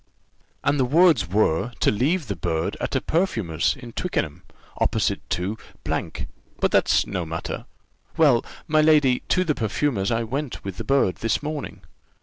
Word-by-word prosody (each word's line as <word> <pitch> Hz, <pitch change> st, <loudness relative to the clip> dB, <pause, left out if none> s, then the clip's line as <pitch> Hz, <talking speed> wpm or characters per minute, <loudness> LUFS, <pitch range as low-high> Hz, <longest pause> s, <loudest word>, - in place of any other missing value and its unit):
"And 145 Hz, 0 st, +2 dB
the -, -, +4 dB
words 160 Hz, -, +4 dB
were, 105 Hz, +2 st, +1 dB
to -, -, +3 dB
leave 145 Hz, -, +1 dB
the 100 Hz, -3 st, -3 dB
bird 80 Hz, -1 st, -2 dB
at -, -, -2 dB
a -, -, +2 dB
perfumer's 110 Hz, -, 0 dB
in 120 Hz, -3 st, -10 dB
Twickenham, 80 Hz, -, -2 dB, 0.4 s
opposite -, -, +1 dB
to; 100 Hz, +5 st, -2 dB, 0.2 s
but -, -, -3 dB
that's -, -, +3 dB
no 90 Hz, -, -3 dB
matter. 80 Hz, 0 st, -5 dB, 0.5 s
Well, 140 Hz, -7 st, +5 dB, 0.2 s
my 155 Hz, 0 st, +4 dB
lady, 150 Hz, -5 st, +4 dB
to 185 Hz, -, +3 dB
the 160 Hz, -4 st, +1 dB
perfumer's 110 Hz, -3 st, 0 dB
I 115 Hz, 0 st, +1 dB
went 135 Hz, +4 st, -4 dB
with 95 Hz, -1 st, -5 dB
the -, -, -4 dB
bird, 135 Hz, -9 st, +2 dB
this 115 Hz, +5 st, -1 dB
morning. 150 Hz, -1 st, -5 dB
125 Hz, 155 wpm, -24 LUFS, 95-150 Hz, 0.5 s, Well